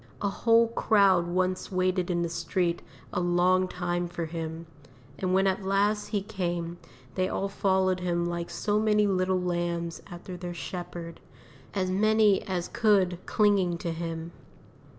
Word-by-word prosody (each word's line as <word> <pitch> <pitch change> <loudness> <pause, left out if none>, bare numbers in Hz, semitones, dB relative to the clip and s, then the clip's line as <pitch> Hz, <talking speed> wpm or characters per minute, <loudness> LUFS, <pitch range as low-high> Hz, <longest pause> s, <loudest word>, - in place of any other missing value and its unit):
A 200 - +2
whole 230 +3 +3
crowd 195 -6 +3
once 185 +2 -1
waited 185 -1 0
in 175 -1 0
the - - 0
street 170 +1 -1 0.3
a - - 0
long 180 +1 +3
time 175 -1 -2
for 170 -1 -4
him, 160 0 -5 0.5
and 185 -1 -1
when 190 +1 +3
at 190 0 0
last 205 +2 +1
he 205 -2 -1
came, 175 -4 -3 0.3
they 185 0 0
all 195 - -1
followed 190 -2 +1
him 175 -1 0
like 170 0 -3
so 210 -1 0
many 210 -1 +3
little 185 -1 +1
lambs 175 -1 -2
after 175 +1 -8
their 175 0 -6
shepherd, 175 -1 -6 0.6
as 185 -2 0
many 215 0 +4
as 180 -3 -2
could 190 -5 +2
clinging 200 -5 +2
to 170 0 -3
him. 165 0 -5
185 Hz, 150 wpm, -28 LUFS, 175-195 Hz, 0.6 s, many